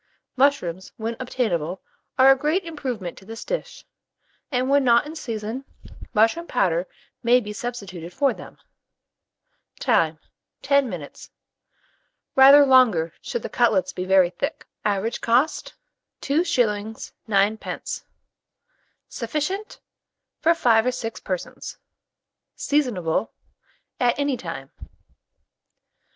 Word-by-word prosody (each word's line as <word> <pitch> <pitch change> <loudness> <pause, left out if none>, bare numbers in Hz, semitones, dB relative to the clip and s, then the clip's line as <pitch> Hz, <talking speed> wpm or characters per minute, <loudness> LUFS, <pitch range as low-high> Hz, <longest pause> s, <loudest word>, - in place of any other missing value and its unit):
Mushrooms, 220 -10 +1
when 225 +1 -3
obtainable, 190 -9 -2 0.4
are 260 +1 +8
a - - +6
great 305 +8 0
improvement 255 - -5
to - - -18
this 225 +2 -8
dish, - - -5 0.7
and 255 -1 0
when 280 +1 +4
not 235 0 +4
in 310 +2 -8
season, 230 -2 -5 0.5
mushroom 225 +11 +2
powder 180 -6 +1 0.3
may 245 0 +5
be 210 -3 -6
substituted 200 -8 -6
for 275 +9 +1
them. - - -12 1.2
Time. 165 - +2 0.5
10 280 -2 +3
minutes; 165 -7 -8 1.1
rather 275 +2 +9
longer, 230 -12 +4
should 475 - -4
the - - -3
cutlets 280 0 +1
be 180 - -4
very 185 -1 +4
thick. 280 - -4 0.2
Average 210 +3 -1
cost, 265 - +1 0.5
2s. 240 - 0 0.2
9d. 205 +1 -1 1.0
Sufficient 375 +8 -4 0.6
for 335 +1 +3
5 235 -7 +3
or - - +3
6 230 -3 -5
persons. 185 -3 -5 0.8
Seasonable 220 - 0 0.7
at 245 -1 +2
any 285 -1 0
time. 250 - -7
240 Hz, 110 wpm, -23 LUFS, 200-280 Hz, 1.2 s, rather